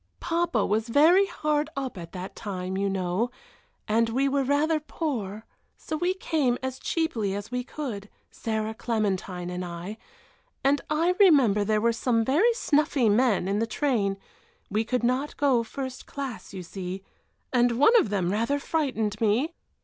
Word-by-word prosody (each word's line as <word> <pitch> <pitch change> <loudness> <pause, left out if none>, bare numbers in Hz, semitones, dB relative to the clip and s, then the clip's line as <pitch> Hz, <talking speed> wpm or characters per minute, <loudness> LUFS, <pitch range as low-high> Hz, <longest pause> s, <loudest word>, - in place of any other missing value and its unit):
"Papa 335 -10 0
was 220 +3 0
very 335 +10 +5
hard 300 -4 -1
up 265 -4 -3
at 170 -3 -8
that 185 0 -7
time, 190 -3 -4
you 200 +1 0
know, 190 +4 -1 0.6
and 225 +2 +2
we 265 +4 +1
were 275 0 +1
rather 295 +4 +2
poor, 230 - -4 0.3
so 315 - -5
we 355 +4 0
came 295 -9 0
as 260 0 -3
cheaply 230 - -1
as 205 +3 -6
we 250 0 -1
could, 235 -8 -6 0.2
Sarah, 220 -1 -2
Clementine, 195 -6 -2
and 180 0 -4
I, 175 +5 -6 0.6
and 280 +1 +3
I 330 +4 +2
remember 270 - +5
there 215 +1 +1
were 235 +1 +3
some 230 -1 +1
very 335 - +4
snuffy 290 - +2
men 210 -3 +3
in 200 +2 0
the 230 - 0
train 220 -6 0 0.5
we 215 +3 +1
could 250 +2 -1
not 255 +4 0
go 270 -5 +3
first 260 +2 -6
class, 275 -5 -6
you 190 -3 -7
see 185 +1 -6 0.5
and 245 -1 +4
one 300 - +6
of 220 - 0
them 190 -3 0
rather 230 +7 +1
frightened 250 -9 -1
me." 235 +10 +2
235 Hz, 165 wpm, -26 LUFS, 205-285 Hz, 0.6 s, one